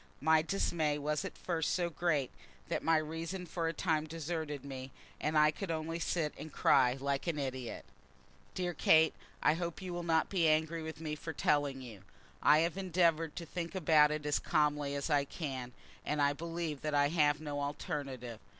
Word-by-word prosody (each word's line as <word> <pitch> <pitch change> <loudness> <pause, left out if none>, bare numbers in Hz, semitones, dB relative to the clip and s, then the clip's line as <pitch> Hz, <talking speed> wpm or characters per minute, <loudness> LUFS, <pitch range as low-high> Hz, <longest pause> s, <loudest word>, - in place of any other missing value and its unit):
My 160 +1 +4
dismay 160 -3 0
was 150 +4 -1
at 190 - -6
first 165 -3 -1
so 175 -2 0
great 155 -6 0 0.4
that - - -1
my 165 0 +3
reason 165 +4 -4
for 165 -1 -2
a - - +1
time 155 -4 0
deserted 155 -3 -4
me, 130 -1 -6 0.3
and 155 +1 0
I 150 0 +6
could 190 +4 -6
only 165 +1 -2
sit 165 -3 -1
and 155 - -7
cry 125 -2 +4
like 140 +3 -1
an 165 -3 0
idiot. 130 -4 -4 0.7
Dear 180 -1 -1
Kate, 160 0 +5 0.3
I 150 - +5
hope 170 0 -4
you 185 -2 -5
will 175 - -3
not 165 -2 +2
be 175 -4 +2
angry 160 +1 +2
with 160 0 -6
me 155 -2 -3
for 160 +2 -5
telling 145 -4 +1
you. 115 -6 -10 0.4
I 150 +1 +6
have 170 +2 0
endeavoured 170 -4 +1
to 170 - -5
think 170 +3 -5
about 155 -4 +5
it 150 0 -3
as 145 -1 +1
calmly 150 -2 +1
as 140 +3 -2
I 145 -1 +4
can, 135 -4 -5 0.3
and 150 - -1
I 145 0 +3
believe 165 -2 -4
that 150 -1 -1
I 145 0 +4
have 150 -2 +3
no 145 -2 -4
alternative. 135 -5 -4
155 Hz, 190 wpm, -33 LUFS, 145-165 Hz, 0.7 s, I